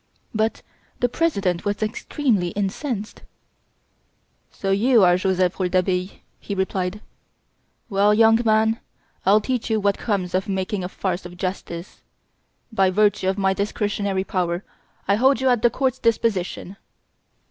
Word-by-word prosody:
But 220 0 -1 0.4
the 245 - +3
President 200 - 0
was 205 +1 -1
extremely 215 -2 0
incensed: 205 +2 -3 1.3
"So, 195 - -3
you 225 +3 +4
are 175 -1 +6
Joseph 185 0 0
Rouletabille," 185 0 +1 0.3
he 200 - -5
replied; 190 +1 -2 0.9
"well, 200 -1 +3
young 225 +1 +5
man, 220 0 +3 0.5
I'll 210 +2 +6
teach 250 +1 -2
you 220 -1 +2
what 200 -1 +1
comes 195 -5 -2
of 190 +2 -1
making 190 0 -2
a 180 - -4
farce 185 -1 -3
of 175 0 -10
justice. 180 -1 -5 0.7
By 195 -3 +3
virtue 205 -1 +2
of 190 - -1
my 195 -1 +2
discretionary 200 -1 -1
power, 180 -2 -2 0.4
I 200 +1 +3
hold 265 +4 +4
you 265 0 +2
at 245 -3 +2
the 240 - +5
court's 260 0 -1
disposition." 200 -4 -1
200 Hz, 135 wpm, -22 LUFS, 185-220 Hz, 1.3 s, are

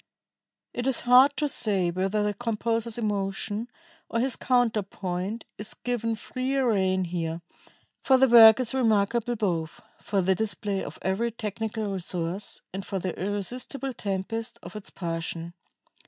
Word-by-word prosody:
It 245 +1 -2
is 265 - +2
hard 255 +3 +6
to 300 - +1
say 195 -9 +1
whether 195 +4 0
the 210 0 0
composer's 230 0 -1
emotion 205 +1 -2 0.4
or 230 - 0
his 255 0 +1
counterpoint 210 -4 -1
is 210 - -3
given 230 -2 -2
freer 255 +3 -1
rein 190 -1 +1
here, 170 -1 -3 0.6
for 265 - +5
the 265 +1 +5
work 230 -1 +9
is 250 -2 -1
remarkable 235 -1 +2
both 170 -7 -2 0.2
for 195 -2 0
the 190 +2 +3
display 205 -1 -1
of - - -7
every 195 +5 0
technical 220 -1 -4
resource 180 +1 -3
and 195 +1 -4
for 195 - -3
the 185 -2 -2
irresistible 245 +7 -3
tempest 220 +3 -3
of - - -10
its 210 - -6
passion.... 165 -1 -4
210 Hz, 140 wpm, -27 LUFS, 190-235 Hz, 0.6 s, work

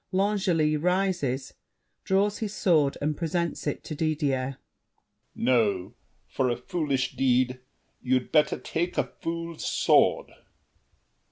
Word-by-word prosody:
[L'Angely 185 -6 +1
rises, 180 -6 0 0.5
draws 200 +2 +1
his 210 -2 -4
sword 155 -8 +2
and 150 +1 0
presents 170 0 -2
it 145 - -3
to - - -6
Didier. 145 -4 -1 0.8
L'ANGLEY. - - -4
No; 105 -5 +2 0.3
for 130 -2 0
a 120 - -1
foolish 140 -3 -2
deed, 125 -1 +2 0.4
you'd 130 0 0
better 150 -1 +3
take 175 +2 -3
A - - +3
fool's 165 0 -6
sword! - - +3
150 Hz, 115 wpm, -27 LUFS, 130-175 Hz, 0.8 s, better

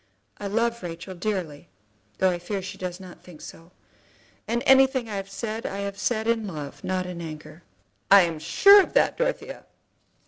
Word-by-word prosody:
I 205 - -4
love 235 +3 -1
Rachel 170 +1 -7
dearly, 180 -6 -4 0.5
though 190 -1 +3
I 175 - -3
fear 190 +2 -4
she 195 +1 -7
does 180 0 -5
not 185 -2 -13
think 175 -4 -14
so, 165 +2 -12 0.8
and 235 +3 -1
anything 265 -2 +4
I 210 -2 -4
have 195 0 -6
said, 220 +3 -5
I 200 +1 -4
have 200 0 -5
said 220 0 -1
in 230 -2 0
love, 145 -4 -8
not 185 -1 -2
in 180 -1 -7
anger." 155 +1 -9 0.5
"I'm 175 -5 +5
sure 400 - +7
of - - -5
that, - - +3
Dorothea." - - -3
195 Hz, 175 wpm, -25 LUFS, 175-225 Hz, 0.8 s, sure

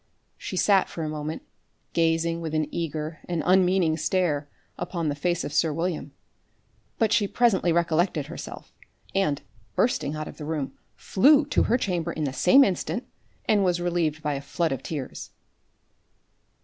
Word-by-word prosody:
She 185 - -6
sat 195 0 +4
for 165 - -5
a 155 - -2
moment 155 +1 -4 0.5
gazing 165 0 +1
with 160 -1 -3
an 155 0 +2
eager 155 -1 -3
and 170 -2 -1
unmeaning 180 -3 +3
stare 155 -3 0 0.3
upon 170 -2 -3
the - - 0
face 175 +4 -1
of 145 - -5
sir 155 +1 +2
William. 165 -2 -2 0.9
But 220 -1 +2
she 205 - +3
presently 200 -7 +2
recollected 170 -2 +1
herself, 165 +4 -9 0.4
and, 190 -8 +1 0.3
bursting 155 - +1
out 155 0 -4
of - - -10
the 150 - -7
room, 150 -3 -3 0.2
flew 285 +8 +4
to 290 - +2
her 240 - +3
chamber 175 -7 -1
in 155 - -3
the 135 -3 -1
same 270 - +6
instant, 215 +4 -1 0.4
and 210 -2 +3
was 180 -2 +2
relieved 170 -3 -1
by 150 -1 0
a 140 - -3
flood 165 +3 -1
of 135 - -2
tears. 145 -5 -6
165 Hz, 160 wpm, -26 LUFS, 155-185 Hz, 0.9 s, same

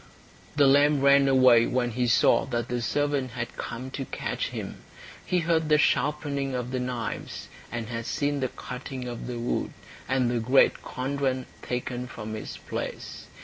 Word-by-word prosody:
The 145 -1 +5
lamb 145 +1 +5
ran 140 0 +6
away 130 -3 +6
when 125 -1 0
he 125 +2 0
saw 115 0 +4
that 120 -2 -3
the 120 0 -1
servant 140 -1 0
had 120 0 -5
come 130 +3 -6
to 135 0 -4
catch - - -3
him. - - -6 0.5
He 180 -1 +1
heard 160 -1 +1
the 150 - +6
sharpening 140 -2 +1
of 125 0 -3
the 130 - -1
knives, 125 -2 -4 0.2
and 115 -2 -4
had 115 -1 -4
seen 145 0 0
the 130 - 0
cutting 125 0 -7
of 120 -1 -6
the 125 -1 -4
wood, 120 +1 -2 0.4
and 130 -1 +2
the 120 - 0
great 125 +4 +4
cauldron 130 -1 -2 0.2
taken 125 0 -3
from 110 -3 -6
its 110 - -6
place. - - -6
130 Hz, 170 wpm, -27 LUFS, 120-140 Hz, 0.5 s, ran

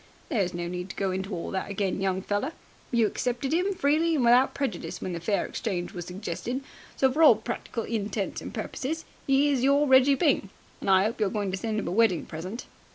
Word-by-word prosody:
"There's 200 - +1
no 175 0 -3
need 180 +1 -5
to - - -7
go 195 -1 -1
into 190 +2 -3
all 175 -3 -4
that 190 0 -3
again, 195 -1 -1
young 190 -1 0
feller. 205 +11 -1 0.4
You 235 -2 +3
accepted 245 +6 -1
'im 370 +4 +1
freely 320 +2 +2
and 260 -5 +2
without 245 +3 +5
prejudice 260 -11 -3
when 185 - -4
the 170 - -3
fair 200 +4 0
exchange 180 -6 -3
was 175 -2 -6
suggested, 195 +7 -4 0.3
so 265 -1 +3
for 305 +5 0
all 300 -8 +9
practical 230 +1 -4
intents 210 -3 -3
and - - -7
purposes 315 +5 -4 0.2
he 280 +2 +4
is 265 -3 +1
your 280 +2 +4
Reggie 265 +1 +6
Byng. 275 - +2 0.3
I 190 0 +4
'ope 225 +2 -2
you're 210 -2 +2
going 205 -2 -2
to 190 - -2
send 220 +2 -2
him - - -4
a - - -2
wedding 205 -4 +3
present." 185 +9 -6
220 Hz, 215 wpm, -27 LUFS, 190-270 Hz, 0.4 s, all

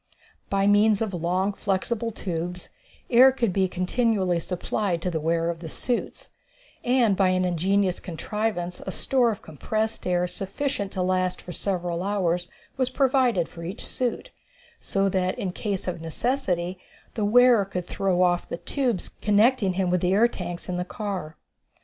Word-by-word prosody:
By 195 0 +2
means 205 +1 +5
of 210 -3 -4
long, 180 +4 0
flexible 210 +4 -1
tubes, 180 -4 -4 0.4
air 255 +2 +8
could 235 -7 0
be 190 0 +2
continually 185 -1 +1
supplied 180 +1 -2
to 180 - -1
the 160 - -1
wearers 165 +2 +1
of 165 - -16
the 165 -1 -7
suits, 245 +7 -3 0.5
and 240 -5 +3
by 190 0 +3
an 185 0 +2
ingenious 185 +2 +1
contrivance 180 0 -3
a 190 - -4
store 250 +4 +2
of 215 - -4
compressed 215 +9 -3
air 180 0 +2
sufficient 200 +3 -3
to 185 - -1
last 185 0 0
for 180 - -9
several 175 -1 -2
hours 180 -3 0 0.3
was 255 -1 +1
provided 255 - +2
for 170 - -10
each 185 +6 -6
suit, 245 -2 -3 0.5
so 195 0 0
that 185 -1 0
in 190 - -2
case 195 0 -3
of 175 -2 -3
necessity 180 - -1 0.3
the 220 - -2
wearer 240 +1 +6
could 180 -2 -4
throw 185 -2 +1
off 175 -1 +1
the - - -3
tubes 245 -3 -1
connecting 210 -1 +3
him 185 -1 0
with 180 -1 +2
the 180 +1 +2
air 220 +4 +5
tanks 175 -6 -6
in 180 -1 -2
the 180 - -1
car. 190 -5 -5
190 Hz, 165 wpm, -25 LUFS, 180-220 Hz, 0.5 s, air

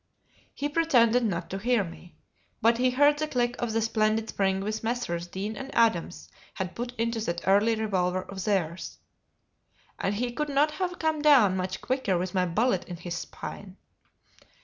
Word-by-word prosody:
He 290 - -1
pretended 250 -7 +3
not 175 -6 -2
to 195 - -3
hear 240 0 +2
me, 175 0 -11 0.4
but 230 +2 +3
he 255 0 +4
heard 290 +3 +4
the 310 - 0
click 245 -3 0
of 240 -2 -1
the 225 0 +1
splendid 220 0 +1
spring 190 -1 0
which 215 +2 -3
Messrs. 225 -8 -2
Deane 200 +5 -4
and 265 +4 -7
Adams 220 -7 +1 0.3
had 185 -1 -4
put 240 +1 -5
into 230 0 -1
that 175 -5 -3
early 205 +4 +4
revolver 185 -4 0
of 190 -1 -7
theirs, 185 -4 -1 1.0
and 195 - -1
he 240 +3 -1
could 300 +5 -3
not 290 +2 +3
have 360 +2 -3
come 315 -2 0
down 260 -11 +6
much 185 0 -3
quicker 255 -8 0
with 180 +2 -3
my 185 -1 +1
bullet 195 +2 +1
in 175 - -7
his 175 0 -6
spine. 190 +2 -8
220 Hz, 175 wpm, -27 LUFS, 185-250 Hz, 1.0 s, down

